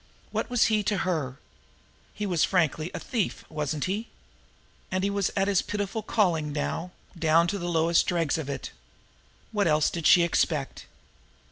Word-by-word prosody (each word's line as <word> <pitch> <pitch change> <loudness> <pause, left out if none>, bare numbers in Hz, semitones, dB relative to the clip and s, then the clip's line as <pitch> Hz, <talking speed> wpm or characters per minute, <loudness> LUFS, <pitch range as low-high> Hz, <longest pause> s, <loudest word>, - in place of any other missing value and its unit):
What - - -2
was 245 -2 +3
he 215 -1 +2
to 205 0 0
her? 150 -8 -2 0.7
He 210 - -4
was 175 -5 +1
frankly 165 -3 +1
a - - -5
thief, 225 -6 -2
wasn't 150 -1 -2
he? 205 +5 -2 0.8
And 185 0 -1
he 200 - +1
was 200 -1 0
at 195 0 +2
his 200 -2 +3
pitiful 205 +1 -3
calling 175 -9 +1
now 155 +4 -3 0.3
down 165 0 +4
to 200 - -2
the 175 0 -3
lowest 165 0 +3
dregs 165 -4 +1
of 145 -3 -5
it. 140 - -5 0.8
What 205 -4 +1
else 155 -1 +3
did 165 -3 0
she 175 - +7
expect? 155 -4 -1
175 Hz, 165 wpm, -27 LUFS, 155-200 Hz, 0.8 s, she